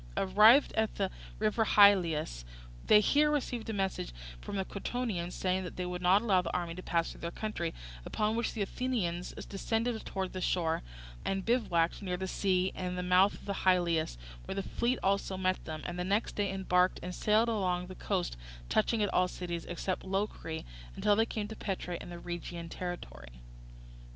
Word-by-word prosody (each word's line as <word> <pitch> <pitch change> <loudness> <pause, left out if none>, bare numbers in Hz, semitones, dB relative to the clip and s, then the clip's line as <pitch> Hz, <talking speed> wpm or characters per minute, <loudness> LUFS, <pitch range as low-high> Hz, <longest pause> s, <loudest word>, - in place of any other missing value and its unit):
Arrived 210 +8 +6
at 220 -1 0
the 195 -2 -1 0.3
river 215 +1 +2
Hylias, 175 - +4 0.4
they 210 - +8
here 295 +8 +4
received 250 -6 -2
a - - -1
message 195 - -2 0.3
from - - -6
the 190 -1 -1
Crotonians, 200 -5 -3
saying 185 0 0
that 180 - -7
they 180 - -3
would 180 0 -4
not 190 +4 +5
allow 195 -5 +4
the 180 - -4
army 170 -1 -3
to 180 - -7
pass 170 -2 0
through - - -12
their 170 - -2
country; 175 -4 -3 0.3
upon 215 - 0
which 235 0 -1
the 210 - 0
Athenians 195 -7 -2 0.2
descended 225 +3 -1
towards 190 -1 -3
the 185 - -4
shore, 165 -3 +1 0.4
and 195 -1 -1
bivouacked 205 -9 +1
near 180 -3 -2
the 190 +1 -3
sea 185 -1 +1
and 180 -1 -4
the 180 - -2
mouth 180 +2 +4
of - - -14
the 200 - -2
Hylias, 170 - +2 0.3
where - - -4
the 195 - -2
fleet 240 +5 0
also 195 -1 +1
met 185 0 0
them, 155 -2 -6
and 175 0 -4
the - - 0
next 200 +4 0
day 200 -2 0
embarked 185 -1 +2
and 180 +1 -4
sailed 215 +4 +3
along 185 -5 0
the 185 - -9
coast 185 - -2 0.3
touching 215 0 +2
at 205 - -1
all 180 0 +4
the - - -10
cities 170 -2 -4
except 180 +2 -2
Locri, 190 -4 -3 0.3
until 205 - +3
they 225 +2 +3
came 215 -2 -3
to 220 - -7
Petra 180 -4 -4
in - - -9
the 175 - -7
Rhegian 170 -1 -6
territory. - - -7
185 Hz, 190 wpm, -31 LUFS, 175-210 Hz, 0.4 s, they